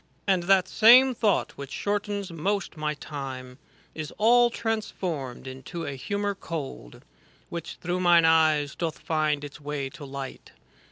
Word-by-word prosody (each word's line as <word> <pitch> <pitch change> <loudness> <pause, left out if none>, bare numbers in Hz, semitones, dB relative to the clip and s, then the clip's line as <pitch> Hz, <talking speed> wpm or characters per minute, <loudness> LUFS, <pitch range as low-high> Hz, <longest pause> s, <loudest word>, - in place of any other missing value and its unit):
And 190 -3 +2
that 190 0 +4
same 250 +6 +7
thought 215 -4 +1
which 140 -1 -6
shortens 205 -2 -2
most 195 +4 -2
my 150 -1 -2
time 135 -3 -7 0.3
Is 155 -2 -6
all 240 +2 +5
transformed 185 - -3
into 135 +6 -7
a - - -3
humour 200 +9 -2
cold. 150 - -7 0.5
Which, 170 -1 -6
through 180 +2 -3
mine 175 -2 +5
eyes, 155 -3 +4
doth 165 -2 -3
find 155 -3 0
its 145 +1 -9
way 145 -2 -4
to 155 +1 -11
light. 135 -1 -8
165 Hz, 145 wpm, -26 LUFS, 145-200 Hz, 0.5 s, same